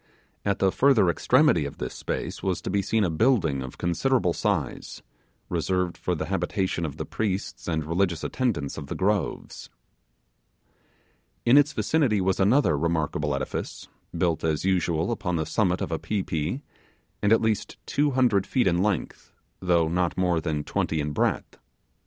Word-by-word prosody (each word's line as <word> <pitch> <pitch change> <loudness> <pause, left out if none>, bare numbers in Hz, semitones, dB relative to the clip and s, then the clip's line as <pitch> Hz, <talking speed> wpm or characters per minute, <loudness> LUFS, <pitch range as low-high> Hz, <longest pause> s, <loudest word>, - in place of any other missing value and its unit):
At 100 -1 0
the 95 -1 +2
further 115 -9 +4
extremity 75 - +3
of 70 - -7
this 65 - -5
space - - -4
was 95 -3 -1
to - - -3
be 100 - +2
seen 110 +3 +1
a 90 - +1
building 80 - +2
of 65 -1 -8
considerable 90 +2 +1
size, 90 - -2 0.4
reserved 90 -2 -1
for 90 - -2
the 80 - -3
habitation 95 -1 -1
of 70 - -8
the - - -4
priests 100 -3 -3
and 80 -3 -1
religious 85 0 0
attendants 90 - -2
of 70 - -8
the - - -4
groves. 100 -1 -2 1.8
In 120 - +6
its 145 +1 +5
vicinity 135 -10 +1
was 95 0 0
another 100 - +4
remarkable 80 0 -1
edifice, - - -5 0.3
built 85 -2 0
as 80 +1 0
usual 90 -1 +1
upon 100 -6 -2
the 80 -1 -1
summit 90 -2 0
of - - -3
a 80 - -1
pi 105 -3 -2
pi, 85 - -3 0.6
and 105 - +2
at 115 - +6
least 110 -2 -1
two 145 +1 +1
hundred 125 -8 +2
feet 125 - +1
in 90 -1 +2
length, 100 -4 -2 0.3
though 85 -3 +2
not 90 +1 0
more 90 -3 +1
than 75 -3 -2
twenty 80 - -1
in 75 0 -2
breadth. 75 - -1
90 Hz, 165 wpm, -26 LUFS, 80-105 Hz, 1.8 s, In